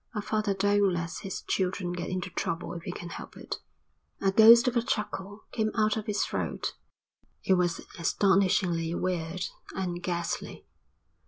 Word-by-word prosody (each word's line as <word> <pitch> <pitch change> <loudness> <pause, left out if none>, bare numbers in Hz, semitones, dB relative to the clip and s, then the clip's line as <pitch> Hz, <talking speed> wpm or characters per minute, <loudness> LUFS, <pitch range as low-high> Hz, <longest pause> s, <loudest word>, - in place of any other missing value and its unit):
A 210 - 0
father 215 -2 0
don't 200 0 +3
let 170 -1 -3
his 195 - -5
children 180 -1 -1
get 175 0 -4
into 185 -1 -3
trouble 170 +1 -3
if 170 - -6
he - - -5
can 175 - -7
help - - -8
it." - - -5 0.6
A 195 - +2
ghost 230 +4 +8
of 250 - +1
a 235 - +4
chuckle 205 -2 -3
came 220 -2 0
out 215 -1 +3
of 220 -2 -4
his 210 -1 +1
throat. - - -3 0.7
It 190 - +3
was 180 -2 +1 0.2
astonishingly 180 -2 +2
weird 180 -1 -2 0.3
and 175 -2 -2
ghastly. 170 -2 -3
190 Hz, 160 wpm, -29 LUFS, 175-210 Hz, 0.7 s, ghost